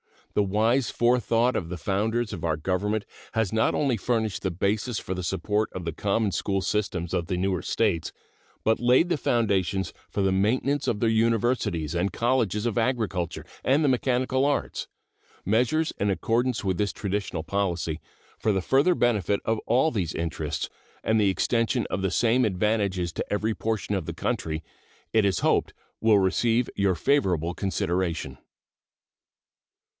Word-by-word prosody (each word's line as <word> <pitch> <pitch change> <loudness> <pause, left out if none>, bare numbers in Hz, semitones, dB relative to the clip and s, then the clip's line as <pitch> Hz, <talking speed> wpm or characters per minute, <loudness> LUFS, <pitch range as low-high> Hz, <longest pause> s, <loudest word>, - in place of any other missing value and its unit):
The - - +3
wise 110 +6 +2
forethought 120 0 +2
of 85 - -2
the 90 +1 -5
founders 110 +5 -1
of 85 - -6
our 80 -2 +1
Government 100 +6 -1 0.3
has 110 -3 0
not 110 0 +2
only 135 -5 +1
furnished 110 0 -1
the 95 - 0
basis 105 +6 -1
for 95 - -4
the 90 - -4
support 105 +6 0
of 95 - -5
the 85 - -1
common 100 +4 0
school 95 +1 -1
systems 90 -3 -2
of 85 - -1
the 90 - -1
newer 95 -1 0
States, 95 -5 0 0.5
but 110 0 +2
laid 125 +8 +4
the 170 - +1
foundations 100 -7 0 0.2
for 100 - -2
the 95 - +2
maintenance 125 +9 +1
of 105 - 0
their 115 - +3
universities 110 - +1
and 90 +3 0
colleges 115 -4 +1
of 120 -2 -1
agriculture 110 -8 -1 0.2
and 140 +4 +3
the 145 - +3
mechanic 130 0 +1
arts. 140 +2 0 0.6
Measures 125 - +2
in 100 - +1
accordance 115 +5 0
with 95 -2 0
this 105 -1 0
traditional 100 -5 -3
policy, 85 -4 -1 0.4
for 110 - +1
the 95 -2 +1
further 140 - +3
benefit 105 - +1
of 110 0 +1
all 130 +7 +3
these 90 - -2
interests 85 0 -3 0.3
and 110 0 +2
the 100 -2 +4
extension 115 +4 +1
of 95 - -1
the 95 - +1
same 120 +6 +3
advantages 100 -3 0
to - - -4
every 105 +2 0
portion 110 -2 -2
of 95 -5 -1
the - - -4
country, 80 0 -2 0.5
it 110 -2 +4
is 95 -4 +1
hoped - - +1 0.3
will 110 -2 +5
receive 115 +5 +2
your 100 -2 +2
favorable 90 - +1
consideration. 85 -7 -2
105 Hz, 160 wpm, -26 LUFS, 95-120 Hz, 0.6 s, will